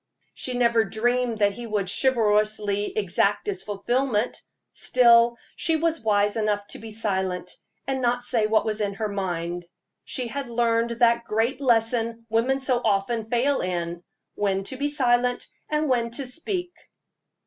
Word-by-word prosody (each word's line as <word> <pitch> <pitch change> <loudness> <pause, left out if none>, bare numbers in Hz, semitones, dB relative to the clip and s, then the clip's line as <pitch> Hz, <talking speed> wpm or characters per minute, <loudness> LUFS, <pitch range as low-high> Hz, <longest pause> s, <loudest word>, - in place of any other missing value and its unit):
She 255 - -3
never 235 -2 +3
dreamed 240 +2 0
that 205 -1 +3
he 235 +4 -8
would 210 -3 -1
chivalrously 210 -3 +1
exact 205 +1 +1
its 190 -2 -2
fulfillment. 225 +3 -1 0.3
Still, 235 -1 +4 0.2
she 325 - +1
was 325 +1 0
wise 205 -2 +2
enough 210 -2 0
to - - -7
be 225 - -9
silent, 190 -4 -2 0.3
and 265 -1 -2
not 245 0 +1
say 230 -3 +1
what 220 0 +2
was 215 -1 -2
in 200 -1 -1
her 215 +2 -2
mind. 175 -3 -3 0.4
She 255 - -3
had 270 +2 -4
learned 230 0 +1
that 235 0 +4
great 230 +5 0
lesson 230 -2 +1
women 255 +4 +1
so 255 -2 +1
often 220 +2 0
fail 265 +4 +1
in 175 -1 -3 0.3
when 195 -1 0
to 260 - -5
be 285 +2 -1
silent 250 -3 +1 0.2
and 305 0 0
when 240 -3 +1
to 275 - -4
speak. 350 +6 -4
230 Hz, 155 wpm, -25 LUFS, 205-245 Hz, 0.4 s, Still